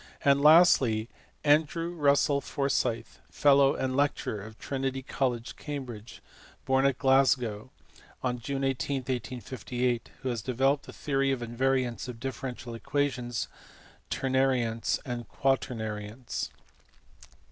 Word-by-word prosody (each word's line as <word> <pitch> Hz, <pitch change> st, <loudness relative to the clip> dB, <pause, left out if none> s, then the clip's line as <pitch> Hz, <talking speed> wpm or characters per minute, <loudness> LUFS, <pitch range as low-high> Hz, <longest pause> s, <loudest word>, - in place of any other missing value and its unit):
And 140 Hz, 0 st, +5 dB
lastly 140 Hz, -8 st, +6 dB, 0.3 s
Andrew 155 Hz, +3 st, +2 dB
Russell 145 Hz, -2 st, +3 dB
Forsyth, 130 Hz, -6 st, -1 dB
fellow 140 Hz, -1 st, +4 dB
and 130 Hz, -1 st, -1 dB
lecturer 140 Hz, -7 st, 0 dB
of 110 Hz, +2 st, -11 dB
Trinity 135 Hz, -1 st, -3 dB
College, 125 Hz, -3 st, -2 dB
Cambridge, 125 Hz, -7 st, -7 dB, 0.4 s
born 135 Hz, +1 st, +3 dB
at 135 Hz, -2 st, 0 dB
Glasgow 130 Hz, -5 st, +2 dB, 0.5 s
on 125 Hz, -1 st, -1 dB
June 135 Hz, +3 st, -3 dB
18, 135 Hz, +1 st, -1 dB
1858, 125 Hz, 0 st, -3 dB
who 130 Hz, -, -1 dB
has 120 Hz, -3 st, -2 dB
developed 135 Hz, +4 st, +1 dB
the -, -, -8 dB
theory 135 Hz, -1 st, 0 dB
of 130 Hz, -2 st, -1 dB
invariants 125 Hz, +1 st, 0 dB
of 120 Hz, -2 st, -7 dB
differential 125 Hz, -1 st, -5 dB
equations, 125 Hz, 0 st, -2 dB, 0.6 s
ternariants, 130 Hz, -4 st, +1 dB
and 120 Hz, -2 st, -5 dB
quaternariants. 115 Hz, -4 st, -2 dB
130 Hz, 110 wpm, -29 LUFS, 120-140 Hz, 0.6 s, lastly